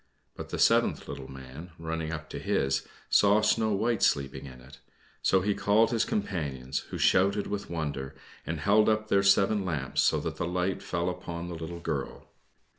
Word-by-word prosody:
But - - -8
the - - -4
seventh - - +3
little 65 - -7
man, 65 +6 -10
running 80 -1 -4
up 75 -1 -6
to - - -5
his, 65 0 0 0.2
saw 105 +1 +4
Snow 110 0 +2
White 110 +2 0
sleeping 70 0 +1
in 65 -1 -11
it; 65 +2 -15 0.4
so 95 - +3
he 100 +2 +1
called 105 +3 +3
his 115 -2 +1
companions, 75 - -2
who - - -5
shouted 100 +2 +3
with 105 -1 -4
wonder 75 -5 -4 0.3
and 85 -1 -4
held 105 +4 +4
up 110 0 0
their 100 - +4
seven 100 +1 +3
lamps, 75 -8 -1
so - - +3
that - - -4
the 85 - -2
light 90 +1 -1
fell 85 0 -2
upon 85 -1 -5
the - - -5
little 80 +1 -6
girl. 75 -5 -4
85 Hz, 185 wpm, -28 LUFS, 75-100 Hz, 0.4 s, saw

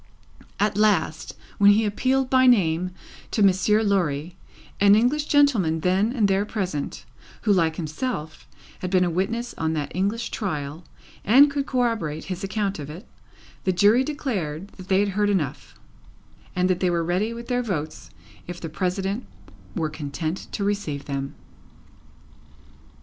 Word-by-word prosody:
At 205 0 +1
last, 185 -7 +1 0.2
when 205 0 +7
he 220 +2 +2
appealed 260 +5 +1
by 260 0 +4
name 180 -7 +3 0.4
to 215 - +1
Monsieur 200 +3 +3
Lorry, 175 -6 0 0.4
an 200 0 +6
English 255 +7 +2
gentleman 230 - +3
then 190 +6 +2
and 230 -5 +2
there 195 +1 +2
present, 185 -9 -4 0.4
who, 210 - +4
like 165 -4 +2
himself, 155 0 -4 0.3
had 185 - -3
been 185 -1 +3
a 175 - 0
witness 230 +8 -2
on 160 0 0
that 145 -2 -3
English 210 +5 -1
trial 155 -5 -4 0.4
and 275 +7 +6
could 280 0 -2
corroborate 225 - -1
his 185 +1 -5
account 195 -1 -2
of 145 -1 -6
it, 170 +8 -10 0.6
the 190 - +2
Jury 205 +7 +4
declared 200 - -3
that 185 -1 -13
they 190 0 +3
had 205 - +1
heard 205 +1 +1
enough, 170 -10 -2 0.8
and 180 0 +2
that 185 -1 +1
they 185 - +2
were 170 -1 0
ready 185 +6 0
with 235 0 -7
their 245 -1 0
votes 160 -10 -4 0.4
if 175 0 -6
the 165 - -6
President 190 +7 -2 0.5
were 160 -5 -1
content 155 +3 -4
to 205 - -2
receive 200 -9 -2
them. 140 -1 -4
195 Hz, 155 wpm, -24 LUFS, 165-220 Hz, 0.8 s, when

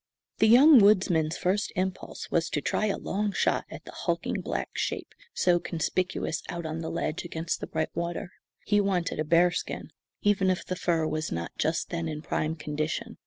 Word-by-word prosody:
The 220 - +5
young 265 +5 +8
woodsman's 180 -6 +4
first 195 +3 0
impulse 185 0 -4
was 170 0 +1
to - - -1
try 215 +8 0
a 200 - 0
long 205 +2 -1
shot - - +1
at - - -10
the - - -9
hulking - - -2
black - - -3
shape - - -3 0.2
so 175 - +3
conspicuous 175 0 -2
out 170 -1 -4
on 160 +1 -3
the 160 - -4
ledge, 165 -1 -2
against 165 -1 -3
the - - -5
bright 160 -1 -2
water. 170 +1 -3 0.3
He 205 0 +3
wanted 180 -5 -1
a - - +2
bearskin, 170 +3 +1 0.3
even 200 -2 +3
if 185 - -1
the 185 - -3
fur 165 -3 +1
was 155 0 -2
not 85 0 -3
just 160 +1 -1
then 170 -1 -2
in 155 -1 -5
prime 155 0 -1
condition. 150 0 -3
170 Hz, 185 wpm, -28 LUFS, 160-190 Hz, 0.3 s, young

